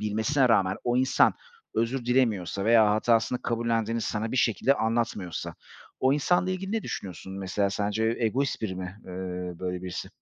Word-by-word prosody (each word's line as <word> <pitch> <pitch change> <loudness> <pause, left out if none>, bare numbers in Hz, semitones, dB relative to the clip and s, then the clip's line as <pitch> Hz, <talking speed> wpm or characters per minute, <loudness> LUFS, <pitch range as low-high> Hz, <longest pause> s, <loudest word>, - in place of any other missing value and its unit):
bilmesine 110 +6 +1
rağmen 95 -4 +3
o 120 0 +1
insan 130 +1 +4 0.4
özür 115 +2 0
dilemiyorsa 110 -7 +1
veya 110 -1 +5
hatasını 115 +3 +2
kabullendiğini 115 -1 0
sana 110 +1 -2
bir - - -1
şekilde 125 +4 +3
anlatmıyorsa 110 - -2 0.5
o 130 +1 +4
insanla 175 +5 +2
ilgili 190 +2 -3
ne 225 - 0
düşünüyorsun? 95 0 -6
Mesela 100 +1 0
sence 105 +3 0
egoist 125 +4 0
biri 95 -4 -2
mi, 90 +1 -6
eee, 90 - -8 0.5
böyle 90 -1 -3
birisi? 90 -1 -5
115 Hz, 155 wpm, -27 LUFS, 100-125 Hz, 0.5 s, veya